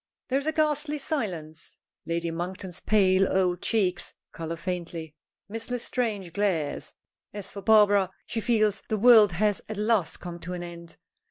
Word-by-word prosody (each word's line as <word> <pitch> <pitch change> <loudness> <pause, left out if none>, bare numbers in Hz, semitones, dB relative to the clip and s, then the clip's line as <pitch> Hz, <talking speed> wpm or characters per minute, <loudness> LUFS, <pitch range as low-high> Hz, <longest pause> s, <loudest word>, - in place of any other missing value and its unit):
There 270 +1 +2
is 280 - -6
a - - +3
ghastly 300 -1 0
silence. 180 - -4 0.3
Lady 170 0 -1
Monkton's 180 +2 -5
pale 195 -2 +3
old 180 -2 +1
cheeks 195 -6 0 0.2
color 165 0 -5
faintly. 170 -3 -5 0.3
Miss 225 +3 -6
L'Estrange 225 -7 -2
glares. 180 -7 -1 0.4
As 205 -2 -6
for 200 - -7
Barbara, 205 -2 +5 0.2
she 225 - -2
feels 215 -3 +2
the 215 - +1
world 215 -3 +7
has 205 +3 +1
at 215 - -5
last 210 -4 +1
come 175 -1 -7
to 180 +1 -6
an 175 -1 -5
end. 170 -1 -10
195 Hz, 155 wpm, -27 LUFS, 175-220 Hz, 0.4 s, world